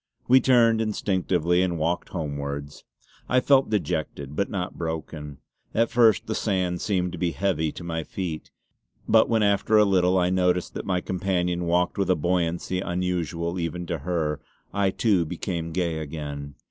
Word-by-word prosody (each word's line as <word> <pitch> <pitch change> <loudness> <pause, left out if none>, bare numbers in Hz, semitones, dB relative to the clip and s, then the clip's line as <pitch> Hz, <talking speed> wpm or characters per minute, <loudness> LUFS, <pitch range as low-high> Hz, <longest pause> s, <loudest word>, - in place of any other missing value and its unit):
We 130 +1 +6
turned 115 -3 +4
instinctively 90 -5 +1
and 90 -2 0
walked 85 +3 -1
homewards. 70 -3 -5 0.4
I 125 - +4
felt 135 +1 +4
dejected, 75 -7 -2
but 100 - 0
not 95 -3 -3
broken. 80 -3 -5 0.4
At 115 +1 +2
first 115 -3 +4
the 110 - -2
sand 90 -5 -1
seemed 90 -3 0
to 90 - -7
be 85 -2 0
heavy 85 -6 0
to - - -9
my 80 -1 -3
feet; 85 -4 -5 0.6
but 110 0 +5
when 110 -2 +2
after 100 +2 +3
a 105 - +6
little 95 -1 +3
I 90 0 +2
noticed 90 -1 +1
that - - -6
my 90 -2 +1
companion 90 -2 -1
walked 90 +3 +1
with 100 - +1
a 90 - +5
buoyancy 85 +2 -1
unusual 90 -1 -2
even 85 +1 -3
to 85 -2 -3
her, 75 -2 -1 0.3
I 100 -1 +2
too 95 -2 +2
became 85 0 -4
gay 85 -2 -1
again. 70 -2 -6
90 Hz, 165 wpm, -25 LUFS, 80-95 Hz, 0.6 s, We